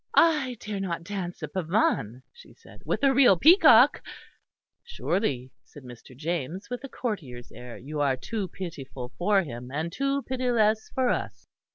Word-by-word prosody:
"I 300 -7 +3
dare 210 -2 -5
not 170 -3 -3
dance 180 -3 -6
a - - -2
pavane," 155 - -1
she 475 - -17
said, - - -17
"with - - -1
a 275 -1 +5
real 250 -8 +6
peacock." 335 - +6 0.8
"Surely," 160 - -2
said 145 - -15
Mr. 125 0 -13
James, 170 - -4
with 245 +1 -5
a 275 - -7
courtier's 150 - -5
air, 120 +1 -10
"you 150 +4 -6
are 135 -2 +1
too 210 - -4
pitiful 135 -9 -7
for 195 +2 +3
him, 125 -4 -8
and 160 +4 -3
too 275 +5 -1
pitiless 235 -4 +1
for 260 -2 +2
us." - - -3
185 Hz, 160 wpm, -26 LUFS, -, 0.8 s, real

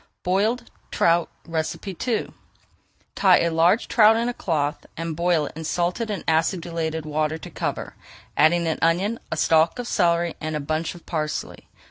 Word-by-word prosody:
BOILED 205 +7 0 0.2
TROUT 170 0 +2 0.2
II 185 +7 -2 0.8
Tie - - +5
a 170 - +1
large 170 +7 +3
trout 220 -1 +6
in 235 +1 0
a - - -2
cloth 155 -8 -2
and 165 -1 -3
boil 170 -2 +2
it - - -8
in 160 - -6
salted 180 +8 -1
and 205 -4 -3
acidulated 160 -1 0
water 155 +1 -1
to - - -10
cover, - - -4 0.4
adding 170 +2 +4
an 160 -1 -1
onion, 185 +7 +1
a - - -2
stalk 160 +3 +3
of 245 -1 -4
celery, 170 -4 +1
and 155 0 -3
a - - -1
bunch 155 +4 -2
of 175 - -14
parsley. 155 -2 -4
170 Hz, 160 wpm, -23 LUFS, 160-185 Hz, 0.8 s, trout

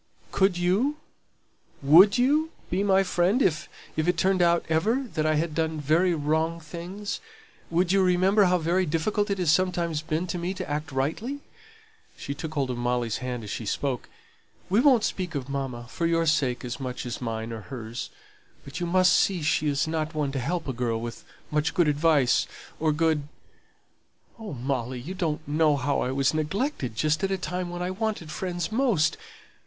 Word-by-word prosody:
"Could 190 -2 +2
you? 200 +12 +1 0.9
Would 180 - +7
you 295 +6 +3 0.2
be 185 +3 +1
my 195 -1 +4
friend 180 +5 +2
if 165 - +1 0.3
if 155 +1 0
it 180 -1 +2
turned 185 +1 +2
out 170 0 +3
ever 215 +12 +1
that 155 0 0
I 155 - +2
had 155 +1 -1
done 160 0 -1
very 165 +5 +2
wrong 160 +2 0
things? 175 +6 -6 0.5
Would 175 +2 +1
you 195 0 +4
remember 190 +3 +4
how 180 0 +3
very 175 +2 +1
difficult 205 +7 0
it 200 - 0
has 175 -5 +2
sometimes 170 -3 +1
been 155 +2 -2
to 180 0 -3
me 180 +3 -3
to 185 -1 -5
act 150 +1 -3
rightly?" 165 - -2 0.8
(she 140 - -5
took 155 +2 -6
hold 135 -3 0
of 120 - -4
Molly's 120 -2 0
hand 125 -2 -4
as 105 - -6
she 110 - -4
spoke). 130 +3 -2 0.6
"We 205 - +4
won't 255 -4 +5
speak 180 -6 -2
of 135 -2 -3
mamma, 135 -4 -4
for 165 +6 -2
your 165 0 +2
sake 135 -6 +1
as 120 +1 -5
much 130 -2 -5
as 120 0 -5
mine 115 -1 -3
or 110 - -6
hers; 120 -2 -6 0.6
but 140 +3 -7
you 175 - -2
must 185 +1 +4
see 185 -5 +2
she 150 0 +1
isn't 155 +2 -1
one 145 -2 0
to 135 - -2
help 165 +6 -2
a 130 - -2
girl 115 -2 -1
with 115 0 -7 0.3
much 150 +1 0
good 175 -3 +4
advice, 145 -3 +3 0.3
or 155 0 +2
good 155 -2 +1 1.1
Oh, 215 -6 -6
Molly, 125 -1 -3
you 155 +10 -6
don't 165 -7 -2
know 150 0 +3
how 140 +1 0
I - - -1
was 135 +1 +1
neglected 155 - -2
just 155 - +1
at 195 - +2
a 195 - 0
time 180 +1 -3
when 175 0 -4
I 180 - -2
wanted 200 -5 -3
friends 175 0 -3
most. 220 - +2
160 Hz, 190 wpm, -26 LUFS, 140-185 Hz, 1.1 s, Would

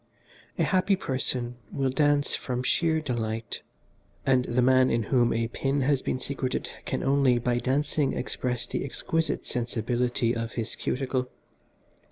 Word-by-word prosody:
A - - +2
happy 190 +1 +3
person 130 -6 -2
will 135 -1 0
dance 145 0 +2
from 125 -1 -2
sheer 160 +3 +2
delight, 115 -5 -3 0.6
and 130 -1 +3
the 120 +1 +1
man 130 0 +5
in 115 -1 +1
whom 120 +1 +3
a 115 0 +1
pin 135 +3 0
has 135 0 +2
been 130 - -2
secreted 130 -1 -2 0.2
can - - -2
only 135 -2 +4
by 120 0 +1
dancing 140 +2 +1
express 125 -2 -2
the - - -3
exquisite 160 +4 -1
sensibility 120 0 0
of 115 0 -3
his 115 -1 -3
cuticle. 130 -1 -1
130 Hz, 145 wpm, -27 LUFS, 120-140 Hz, 0.6 s, man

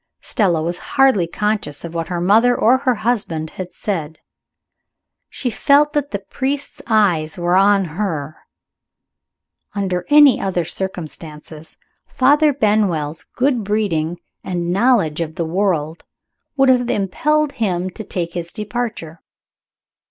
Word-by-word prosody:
Stella 175 -8 0
was 175 +2 -2 0.2
hardly 265 -11 +4
conscious 205 -5 -2
of 170 - -8
what 165 -1 -3
her 175 -2 -3
mother 220 +7 +4
or 250 +4 +4
her 255 -2 +1
husband 205 -9 -2
had 185 -1 -7
said. 160 -6 -4 1.1
She 250 - -3
felt 290 +6 +3
that 290 -2 -1
the 205 - -2
priest's 270 +8 -4
eyes 185 -9 +2
were 175 0 +1
on 195 0 +4
her. 160 -4 -4 1.4
Under 185 -3 -1
any 295 -2 +6
other 180 -3 -1
circumstances, 160 -3 -7 0.3
Father 290 +4 +3
Benwell's 205 - 0
good 255 -3 +1
breeding 175 -6 -1 0.2
and 175 -1 -2
knowledge 200 -8 +2
of 160 -1 -4
the 170 - -2
world 165 -3 -1 0.5
would 270 -1 +4
have 245 -1 +3
impelled 295 +11 0
him 185 -6 -2
to 220 - -8
take 170 -4 -4
his 170 -1 -5
departure. 215 -7 -5
195 Hz, 130 wpm, -19 LUFS, 170-240 Hz, 1.4 s, any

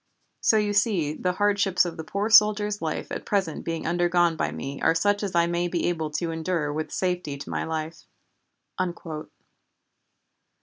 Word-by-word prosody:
So 220 - +3
you 210 -1 +1
see 200 -8 +2
the 180 +3 -1
hardships 200 -2 +2
of 170 -2 -4
the 160 - -6
poor 200 +6 -2
soldier's 210 -1 +5
life 160 -2 -3
at - - -4
present 190 -6 -1
being 165 -1 -3
undergone 175 0 +2
by 75 - -1
me 135 - -6
are - - +3
such 205 +4 +2
as 195 -4 -3
I 170 0 +4
may 170 +1 0
be 175 -1 -1
able 160 -3 -2
to 165 +1 -1
endure 160 -2 -1
with 155 +1 -4
safety 180 -6 -2
to 140 - -9
my - - -1
life!" 160 0 -5
175 Hz, 170 wpm, -25 LUFS, 160-200 Hz, -, soldier's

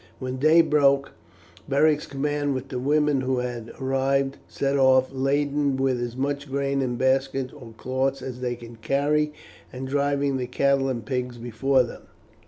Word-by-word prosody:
When 130 0 -4
day 155 +5 +6
broke, 140 -2 +3 0.6
Beric's 150 +2 +3
command, 145 0 -1
with 130 +1 -5
the 125 - -3
women 145 +1 +2
who 130 0 0
had 120 -2 -4
arrived, 135 +1 0
set 140 0 -1
off 130 -1 +4
laden 140 +1 +1
with 130 -2 0
as 120 0 -4
much 140 +1 -2
grain 140 0 0
in 125 -2 -1
baskets 130 0 0
or 125 -6 -12
cloths 130 +2 -1
as 125 -1 -6
they 125 -1 -1
could 115 -1 -12
carry, 145 +5 +1 0.4
and 130 0 -6
driving 140 0 0
the 125 -1 -3
cattle 135 +1 +1
and 120 -4 -3
pigs 125 -2 -3
before 120 +3 +1
them. 120 - -8
135 Hz, 165 wpm, -25 LUFS, 130-140 Hz, 0.6 s, day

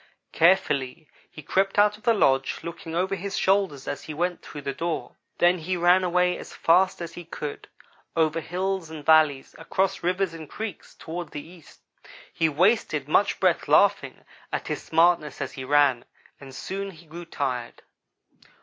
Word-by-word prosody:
"Carefully 155 -5 +2 0.2
he 155 - -12
crept 195 +7 0
out 210 0 +5
of 210 - -18
the 230 0 +3
lodge, 135 -8 +2
looking 170 -1 -7
over 185 +3 0
his 195 +1 -4
shoulder 195 -6 +2
as 140 - -5
he 155 - -7
went 175 +2 -1
through 145 - -9
the 140 - -3
door. 165 0 -4 0.2
Then 175 +1 +3
he 180 +3 -2
ran 175 +2 +4
away 180 0 +1
as - - -10
fast 180 +1 +3
as 170 0 -7
he 175 - -8
could 150 -3 -7 0.5
go. 165 - +4
Over 160 +1 -1
hills 185 0 -3
and 155 -2 -9
valleys, 155 -4 +4
across 190 +4 -1
rivers 180 0 0
and 160 -2 -9
creeks, 220 -5 -7
toward 170 0 -6
the 150 +1 -8
east. 170 -2 -17 0.5
He 160 - +1
wasted 155 - +1
much 195 +6 +2
breath - - +1
laughing - - +2 0.3
at - - -3
his - - -3
smartness 165 -3 +2
as - - -4
he 130 - -7
ran, 140 -3 +3 0.3
and 135 -1 -12
soon 195 +6 -5
he 170 -2 -14
grew 170 +2 -9
tired. 130 -7 -4
170 Hz, 175 wpm, -25 LUFS, 150-185 Hz, 0.5 s, out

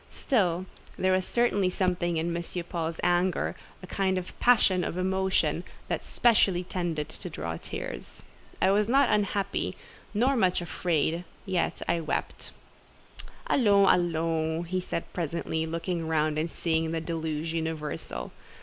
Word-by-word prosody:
Still 185 -8 +1 0.3
there 185 0 +3
certainly 205 -2 +2
was 180 - -2
something 175 -2 +1
in 170 +1 -1
M. 170 - -2 0.2
Paul's 165 -1 -3
anger—a 175 +1 0
kind 190 0 0
of 180 0 -6
passion 205 -7 +4
of 170 - -3
emotion—that 190 +1 -1
specially 200 -6 +3
tended 175 -4 -2
to - - -7
draw 80 +1 -4
tears. - - -7 0.4
I 190 - +4
was 205 +1 +3
not 270 +2 +4
unhappy, 200 -1 0 0.3
nor 250 +6 +2
much 185 -7 +3
afraid, 170 -1 0 0.2
yet 185 -3 -1
I 170 - +2
wept. 160 -2 -3 1.0
"Allons, 200 -6 +5
allons!" 165 -1 0 0.2
said 170 - -2
he - - -24
presently, 160 -1 -2
looking 165 0 -2
round 155 -1 +1
and 160 +2 -1
seeing 160 -1 0
the 165 - 0
deluge 160 -1 -3
universal. 160 -2 -3
175 Hz, 130 wpm, -28 LUFS, 160-190 Hz, 1.0 s, Allons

